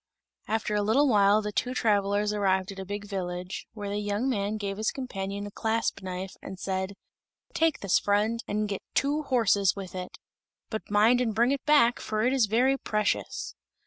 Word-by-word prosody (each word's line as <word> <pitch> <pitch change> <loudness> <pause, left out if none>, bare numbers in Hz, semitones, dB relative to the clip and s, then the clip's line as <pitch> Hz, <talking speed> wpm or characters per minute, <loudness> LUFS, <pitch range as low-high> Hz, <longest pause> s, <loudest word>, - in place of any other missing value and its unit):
After 220 -1 -1
a 210 - +2
little 240 +8 +3
while 210 -2 +4
the 210 - -3
two 250 +4 -1
travelers 205 -2 +1
arrived 190 -1 +1
at 195 - -9
a 190 - -5
big 205 +1 -5
village, 180 -2 -5
where 205 -2 -6
the 205 +1 -2
young 205 +4 -1
man 210 -4 -1
gave 200 -2 -4
his 215 +1 0
companion 200 -6 -4
a 205 - -7
clasp 225 0 -1
knife, 185 0 -5
and 190 - -8
said, 190 +1 -2 0.6
"Take 325 -1 +1
this, 200 -2 +3
friend, 215 +3 +1
and 210 +1 -1
get 200 -2 -4
two 290 +2 +2
horses 220 -8 +2
with 195 -2 -7
it; 185 -1 -6 0.5
but 220 - -5
mind 220 +4 +4
and 225 -4 -1
bring 235 +4 +3
it 280 - -1
back, 285 -6 +5
for 215 0 -2
it 250 +2 +2
is 255 -5 +3
very 255 +6 +2
precious." 210 -1 -1
210 Hz, 190 wpm, -28 LUFS, 200-230 Hz, 0.6 s, back